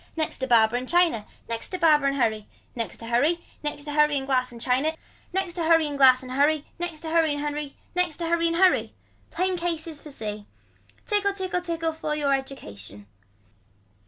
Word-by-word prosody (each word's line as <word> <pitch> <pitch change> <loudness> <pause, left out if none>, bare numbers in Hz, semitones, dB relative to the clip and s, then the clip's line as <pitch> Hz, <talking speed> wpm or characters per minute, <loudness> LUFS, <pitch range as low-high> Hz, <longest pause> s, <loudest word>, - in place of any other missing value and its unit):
Next 315 -1 -2
to 260 - -2
barber 230 -1 +4
and 255 +1 -5
china. 335 -12 +2 0.2
Next 230 -1 -4
to 370 - -3
barber 305 -5 +4
and 275 - +1
hurry. 220 -4 0 0.3
Next 230 -3 -4
to 230 - -10
hurry. 290 +9 +1 0.2
Next 295 -1 -4
to 295 - -5
hurry 300 -1 +4
and 270 - -3
glass 255 -2 0
and 235 - -11
china. 265 +6 +1 0.4
Next 375 -2 -2
to 340 - -3
hurry 325 -1 +5
and 290 -1 -4
glass 260 -2 +6
and 255 - -8
hurry. 290 +3 +2
Next 345 -3 -4
to 320 -1 -5
hurry 325 -2 +3
and 290 - -3
hurry. 295 -1 -4 0.2
Next 355 -4 0
to 340 - -3
hurry 335 0 +2
and 335 - 0
hurry. 370 +1 +3 0.3
Plain 365 +2 -1
cases 330 -3 -3
for 300 - -11
see. 210 -6 -6 0.6
Tickle 400 -1 +1
tickle 370 -2 -2
tickle 330 -2 -2
you - - -11 0.3
for 280 - +3
education. 105 - -6
295 Hz, 200 wpm, -25 LUFS, 255-335 Hz, 0.6 s, glass